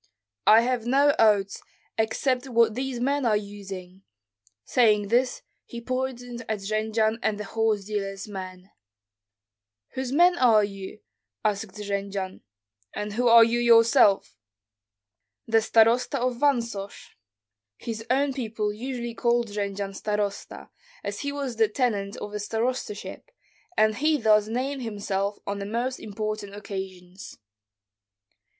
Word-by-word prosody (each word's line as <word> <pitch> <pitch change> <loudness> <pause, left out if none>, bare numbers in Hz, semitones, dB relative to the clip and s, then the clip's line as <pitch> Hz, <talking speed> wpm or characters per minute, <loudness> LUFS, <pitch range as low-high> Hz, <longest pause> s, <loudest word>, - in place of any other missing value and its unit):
"I 220 +2 +8
have 240 -1 -1
no 280 +3 +4
oats, 205 -3 +3 0.3
except 250 +4 0
what 230 -2 +3
these 255 +1 -3
men 280 +3 0
are 220 -3 +3
using." 195 -3 -8 0.6
Saying 210 -4 +3
this, 245 +3 +1 0.2
he 235 - -8
pointed 245 -1 -4
at 215 -2 -2
Jendzian 220 +2 0
and 210 -3 -1
the - - -3
horse 215 -1 0
dealer's 195 -1 -4
men. 185 -1 -8 1.2
"Whose 260 -1 -4
men 350 +4 +4
are 225 -4 +5
you?" 195 0 -7 0.4
asked 205 -1 -1
Jendzian. 200 -2 -4 0.5
"And 210 0 -4
who 245 +3 +1
are 230 0 +9
you 235 +1 +1
yourself?" 230 - +5 1.1
"The 225 0 +3
starosta 230 +5 +3
of 250 -1 -1
Vansosh." 235 -8 -1 0.7
His 225 -1 -6
own 275 +2 +2
people 220 -5 -3
usually 240 +1 -5
called 235 0 +1
Jendzian 200 -1 -3
starosta, 205 0 -4 0.3
as - - -4
he 285 - -3
was 275 -5 -4
the 220 -1 +4
tenant 210 -4 -1
of 205 - -7
a 210 - -3
starostaship, 225 - -3 0.5
and 215 0 +4
he 305 +3 +2
thus 215 -2 +4
named 260 +4 -2
himself 205 -3 -2
on 200 0 -3
the 200 - -5
most 240 +4 -2
important 215 -1 -5
occasions. 190 -2 -8
220 Hz, 130 wpm, -26 LUFS, 205-245 Hz, 1.2 s, are